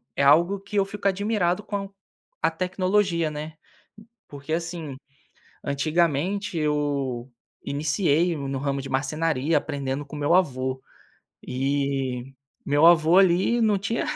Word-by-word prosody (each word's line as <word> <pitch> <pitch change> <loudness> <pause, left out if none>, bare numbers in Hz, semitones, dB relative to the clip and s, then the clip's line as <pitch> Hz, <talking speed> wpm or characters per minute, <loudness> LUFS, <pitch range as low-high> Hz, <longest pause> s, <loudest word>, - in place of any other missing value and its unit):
é 140 - +1
algo 170 +8 +4
que 200 +2 -10
eu 200 - +4
fico 200 0 -3
admirado 200 -1 0
com 200 -1 -4 0.5
a - - +2
tecnologia, 185 -1 0
né, 150 +1 -6 0.7
porque, 145 +2 -6
assim, 165 -4 -4 0.7
antigamente 170 +6 0
eu 145 -5 -1 0.3
iniciei 155 +3 +1
no 140 -1 -3
ramo 140 0 -2
de 135 - -8
marcenaria 150 +2 0
aprendendo 140 -1 -3
com 145 - -10
o 150 - -6
meu 145 +3 +2
avô, 130 -7 +1 0.6
e 135 -1 -2 0.3
meu 145 +3 +3
avô, 170 +1 +6
ali, 190 +5 +4
não 215 -3 +3
tinha 230 - -2
155 Hz, 125 wpm, -25 LUFS, 140-185 Hz, 0.7 s, avô